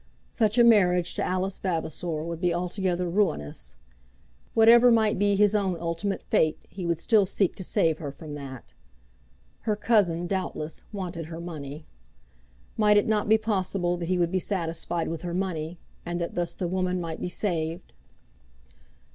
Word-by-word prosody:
Such 220 0 +1
a 240 - +7
marriage 180 -6 +4
to - - -2
Alice 185 +1 -1
Vavasor 165 -2 -2
would 170 0 -5
be 180 -1 +2
altogether 180 +1 -1
ruinous. 170 - -1 0.8
Whatever 235 +2 +7
might 220 -4 +3
be 205 0 +3
his 205 +1 +4
own 195 -4 +1
ultimate 170 +4 -2
fate 155 -1 +1
he 185 -3 -6
would 170 -1 +1
still 210 +5 +3
seek 195 -1 +1
to 190 - -4
save 160 -2 +1
her 145 -3 -5
from 150 +2 -9
that. 135 -3 -9 0.9
Her 215 - -1
cousin, 200 -6 +2
doubtless, 175 -4 -4
wanted 180 -5 -5
her 165 0 -7
money. 155 -3 -7 0.9
Might 210 -1 +5
it 205 - +3
not 215 -1 +1
be 220 - +6
possible 190 -4 -1
that 170 -1 -4
he 185 - +2
would 170 -1 +1
be 190 - +1
satisfied 170 -2 -2
with 165 -1 -4
her 175 -1 -4
money, 175 -3 -3 0.3
and 175 0 -3
that 170 - -3
thus 175 -1 -2
the 180 - -2
woman 185 0 -1
might 165 -2 -5
be - - -2
saved? 170 -2 -3
180 Hz, 165 wpm, -26 LUFS, 165-200 Hz, 0.9 s, a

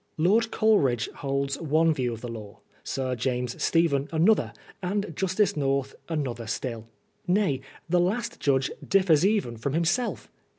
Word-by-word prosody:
Lord 210 +8 +3
Coleridge 140 - +2
holds 140 +1 -2
one 160 +1 +3
view 125 -4 -1
of 115 -1 -7
the 125 - -5
law, 110 -3 -9 0.2
Sir 130 -1 -2
James 125 0 -2
Stephen 155 -4 +2
another, 170 +7 +3 0.3
and 200 +3 -2
Justice 190 +2 +1
North 135 -2 0 0.2
another 130 -8 -3
still. 115 0 -4 0.4
Nay, 180 -8 +2 0.3
the 175 +1 +3
last 220 +7 -1
judge 135 -2 +1 0.2
differs 185 -5 +4
even 195 - +1
from 135 +5 -3
himself. 170 +10 0
150 Hz, 140 wpm, -26 LUFS, 130-185 Hz, 0.4 s, differs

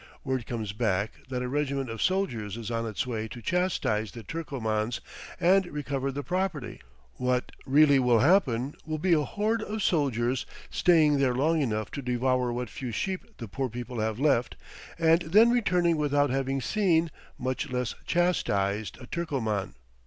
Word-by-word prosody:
Word 130 -4 -2
comes 110 -4 -4
back 105 -2 0 0.2
that 125 -1 -2
a - - -2
regiment 140 0 -1
of 115 -1 -5
soldiers 120 - 0
is 115 0 -5
on 115 0 -1
its 110 +2 -2
way 110 -3 -3
to 120 - -9
chastise 120 - 0
the 115 - -8
Turcomans 115 -6 -2 0.4
and 190 +1 +4
recover 140 -3 -3
the 145 +2 -4
property; 180 -5 -2 0.4
what 125 0 0 0.2
really 140 0 +6
will 125 -2 +4
happen, 135 - +3
will 155 -1 -3
be 175 +3 +2
a 155 - +4
horde 215 +9 -1
of 215 -1 -3
soldiers 130 -6 +1 0.2
staying 155 -5 +4
there 130 -3 +2
long 155 +5 +2
enough 110 -5 -1
to 140 - -5
devour 125 0 +1
what 125 +1 -3
few 125 +4 -5
sheep 190 - -4
the 115 - -7
poor 130 +6 -3
people 120 +1 -6
have 110 +1 -1
left, 135 -5 +2 0.4
and 165 +1 +4
then 210 +9 +5
returning 180 -8 +2
without 145 -2 +2
having 135 0 -1
seen, 170 - +2 0.3
much 130 +4 -2
less 125 -2 -2
chastised, 105 - 0
a 125 - -10
Turcoman. 120 - -2
135 Hz, 165 wpm, -28 LUFS, 120-165 Hz, 0.4 s, really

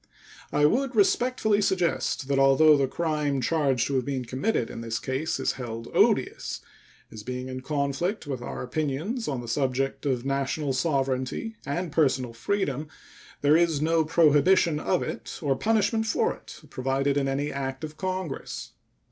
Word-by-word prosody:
I 150 0 +3
would 255 - +1
respectfully 215 0 +2
suggest 180 -7 0
that 140 -1 +1
although 135 +3 +6
the 140 -2 +2
crime 150 -2 -1
charged 135 -3 +1
to 140 - -2
have 130 - -1
been 135 -3 -2
committed 130 - -1
in - - -7
this 115 -1 -3
case 130 +6 -2
is - - +1
held 115 -3 -6
odious, - - +2 0.5
as 110 - -8
being 125 +3 -5
in 130 0 -5
conflict 145 +7 -1
with 135 -4 -4
our - - -5
opinions 155 - -2
on 135 -4 -2
the 120 - -9
subject 135 +3 -1
of 130 -2 -1
national 140 +1 -1
sovereignty 135 - -1
and 170 +4 -2
personal 130 -6 +1
freedom, 150 - -2 0.5
there 145 +1 +5
is 165 -3 +3
no 160 +1 +2
prohibition 160 +1 +4
of 180 +3 0
it - - -6
or 140 -4 +1
punishment 220 - +1
for 450 - +1
it - - -13
provided 135 +2 0
in 140 -1 +1
any 140 +2 -1
act 135 0 -4
of 155 0 -6
Congress. 185 -4 -4
145 Hz, 160 wpm, -26 LUFS, 130-170 Hz, 0.5 s, although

